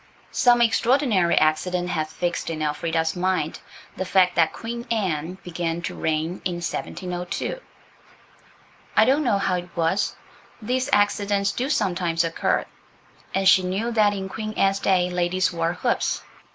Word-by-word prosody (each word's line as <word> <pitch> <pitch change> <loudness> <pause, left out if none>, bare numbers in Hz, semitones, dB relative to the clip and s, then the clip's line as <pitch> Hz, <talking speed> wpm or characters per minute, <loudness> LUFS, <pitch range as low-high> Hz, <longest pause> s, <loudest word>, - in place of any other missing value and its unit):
Some 240 -2 +4
extraordinary 230 -5 +3
accident 175 +3 +1
had 155 -3 -1
fixed 175 +1 -3
in 155 -1 -3
Elfrida's 160 +2 -1
mind 180 -4 -1 0.4
the - - -2
fact 185 -1 +3
that 165 -2 +3
Queen 235 +1 -6
Anne 180 -6 -1
began 170 -1 -3
to - - -3
reign 160 +3 -2
in 180 - -1
1702. 180 - -4 1.4
I - - +7
don't 280 +4 +3
know 235 -7 +2
how 190 -2 0
it 180 0 -6
was. 170 +4 0 0.4
These 250 +3 -1
accidents 205 -1 +2
do 255 +6 -2
sometimes 175 - +1
occur. 165 -1 0 0.7
And 195 0 +2
she 190 - +7
knew 195 +6 -2
that 210 -3 +3
in 190 -1 -4
Queen 215 +2 -5
Anne's 195 -1 +2
day 185 -2 +2
ladies 180 +1 0
wore 165 0 0
hoops. - - -1
185 Hz, 145 wpm, -24 LUFS, 170-205 Hz, 1.4 s, I